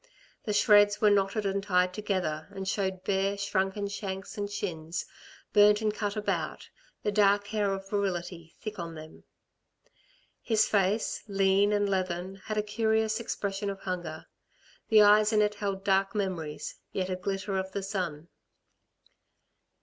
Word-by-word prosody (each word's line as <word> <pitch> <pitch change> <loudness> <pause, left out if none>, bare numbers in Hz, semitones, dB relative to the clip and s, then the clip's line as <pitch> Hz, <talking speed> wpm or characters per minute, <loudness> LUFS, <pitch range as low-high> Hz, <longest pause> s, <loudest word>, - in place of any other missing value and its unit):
The 210 - -1
shreds 205 0 +5
were 210 -1 +5
knotted 200 +1 +1
and 195 0 0
tied 180 -2 +2
together, 180 -7 -2
and 190 0 -5
showed 190 -2 -1
bare, 195 +1 0
shrunken 200 0 -1
shanks 195 -1 -5
and 205 -1 -3
shins, 170 -5 -4 0.5
burnt 210 0 +6
and 215 -1 0
cut 205 -1 -3
about, 210 -1 -2 0.4
the 210 - +1
dark 205 0 +3
hair 205 -2 0
of 195 0 -4
virility 175 -4 -3
thick 215 -2 -6
on 165 -1 -5
them. 155 0 -12 1.2
His 220 -2 +2
face, 205 +2 +1
lean 195 0 +3
and 205 -1 +2
leathern, 185 -1 -2
had 215 - -3
a 210 - +2
curious 220 +1 +1
expression 200 -3 -3
of 195 -1 -6
hunger. 175 -4 -5 0.6
The 215 -1 +7
eyes 210 +1 +6
in 210 -1 +4
it 210 0 +1
held 200 -2 -3
dark 195 +1 +2
memories, 175 -7 -3
yet 185 -1 -2
a - - 0
glitter 195 +1 -2
of 190 0 -4
the 200 0 -3
sun. 175 -5 -4
195 Hz, 150 wpm, -29 LUFS, 190-210 Hz, 1.2 s, The